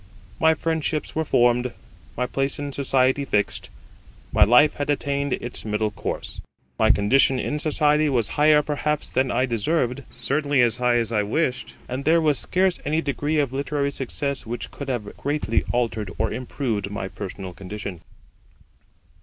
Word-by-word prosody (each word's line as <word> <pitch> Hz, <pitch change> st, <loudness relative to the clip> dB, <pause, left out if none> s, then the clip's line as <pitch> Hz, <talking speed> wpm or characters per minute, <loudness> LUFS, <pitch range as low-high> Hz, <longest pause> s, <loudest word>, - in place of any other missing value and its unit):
My 160 Hz, 0 st, +4 dB
friendships 160 Hz, -1 st, -2 dB
were 160 Hz, -, 0 dB
formed, 120 Hz, -3 st, +2 dB, 0.4 s
my 125 Hz, -, +1 dB
place 135 Hz, +2 st, -1 dB
in 145 Hz, -1 st, -4 dB
society 135 Hz, 0 st, +2 dB
fixed, 105 Hz, -6 st, -1 dB, 0.6 s
my -, -, +6 dB
life 125 Hz, +7 st, +6 dB
had 145 Hz, 0 st, -4 dB
attained 140 Hz, -1 st, 0 dB
its 120 Hz, -, -4 dB
middle 105 Hz, 0 st, -1 dB
course. -, -, -5 dB, 0.4 s
My 110 Hz, -, +4 dB
condition 130 Hz, +5 st, +4 dB
in 150 Hz, +4 st, -2 dB
society 150 Hz, 0 st, +2 dB
was 120 Hz, -6 st, +2 dB
higher 150 Hz, 0 st, +4 dB
perhaps 150 Hz, 0 st, -2 dB
than 130 Hz, 0 st, +1 dB
I 125 Hz, +2 st, +1 dB
deserved, 125 Hz, +2 st, 0 dB
certainly 140 Hz, +3 st, 0 dB
as 120 Hz, -2 st, +1 dB
high 125 Hz, -1 st, +2 dB
as 115 Hz, -2 st, +1 dB
I 105 Hz, -2 st, +2 dB
wished, 125 Hz, +5 st, -1 dB
and 130 Hz, +2 st, -4 dB
there 165 Hz, +3 st, +4 dB
was 150 Hz, -4 st, +2 dB
scarce 185 Hz, 0 st, +1 dB
any 155 Hz, +3 st, 0 dB
degree 145 Hz, +3 st, -1 dB
of 140 Hz, -4 st, +1 dB
literary 140 Hz, +1 st, -1 dB
success 140 Hz, +1 st, -3 dB
which 120 Hz, +2 st, -6 dB
could 140 Hz, -1 st, -7 dB
have 115 Hz, -5 st, -3 dB
greatly 145 Hz, -5 st, 0 dB
altered 115 Hz, -4 st, -1 dB
or 110 Hz, +1 st, 0 dB
improved 120 Hz, -6 st, -3 dB
my 100 Hz, -2 st, -4 dB
personal 95 Hz, -2 st, -7 dB
condition. 100 Hz, -1 st, -7 dB
135 Hz, 160 wpm, -23 LUFS, 115-145 Hz, 0.6 s, my